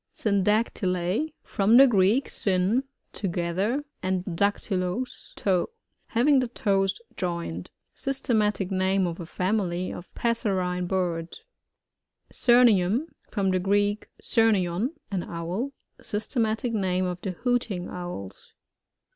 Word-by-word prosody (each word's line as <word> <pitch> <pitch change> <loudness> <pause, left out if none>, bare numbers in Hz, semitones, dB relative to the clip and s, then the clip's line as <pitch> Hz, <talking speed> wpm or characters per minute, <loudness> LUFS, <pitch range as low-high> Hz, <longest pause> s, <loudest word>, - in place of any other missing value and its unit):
Synoactyub. 200 - +1
— - - -53
From 210 +4 +3
the 270 - +10
Greek, 220 +2 +3
sun, 195 +7 +1 0.3
together, 190 +8 -1 0.2
and 185 -1 -1
daktuloa, 190 +3 0 0.3
toe. 190 - +1 0.4
Hav 235 +4 +1
ing 285 -3 +6
the 255 - 0
toes 195 - 0 0.2
joined. 170 - -3 0.2
Systematic 215 -7 0
name 190 0 +2
of 170 0 -4
a 170 - -6
fomily 185 -1 -1
of 175 - -10
passerine 190 -6 0
birds. 175 - -2 0.9
Syrnium. 240 - +4
— - - -39
From 195 -3 +1
the 185 - +2
Greek, 205 +3 +1
surnton, 215 - +2 0.2
an 190 -3 -1
owl. 175 +11 -4 0.3
Systematic 220 +2 -1
name 185 -3 0
of 180 -1 -4
the 190 - -3
Hooting 235 -5 -1
Owls. 175 - -7
195 Hz, 115 wpm, -26 LUFS, 180-225 Hz, 0.9 s, the